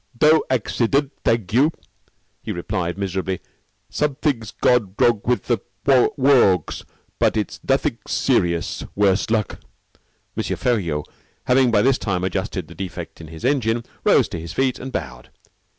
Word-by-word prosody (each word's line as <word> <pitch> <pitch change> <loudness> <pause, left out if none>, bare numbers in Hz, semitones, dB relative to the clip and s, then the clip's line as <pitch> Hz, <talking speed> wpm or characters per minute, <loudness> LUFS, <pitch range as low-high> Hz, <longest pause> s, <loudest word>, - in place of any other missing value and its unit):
"Doe 155 +4 +5
accident, 130 +3 +1
thag 115 -4 0
you," 140 +7 +4 0.7
he - - -5
replied 85 0 -3
miserably. 95 -1 -2 0.5
"Somethig's 135 -3 -1
gone 110 -5 +1
wrong 115 -4 +3
with 125 0 +1
the 120 -2 +1 0.3
worgs, 130 - +3 0.4
but - - +2
it's 105 - -3
nothing - - +1
serious, 85 -1 0
worse 100 0 +2
luck." 110 -2 -1 0.8
M. - - -1
Feriaud, 85 -12 -1 0.4
having 130 0 +4
by 105 -3 +3
this 135 0 +3
time 90 -4 -2
adjusted 95 -1 -2
the - - -11
defect 90 -3 -7
in 80 - -10
his 80 +5 -8
engine, 120 -4 +1 0.2
rose - - +4
to 85 - -5
his 85 +1 -7
feet, 130 -1 0
and 130 +1 -6
bowed. 65 - -6
110 Hz, 140 wpm, -21 LUFS, 90-130 Hz, 0.8 s, Doe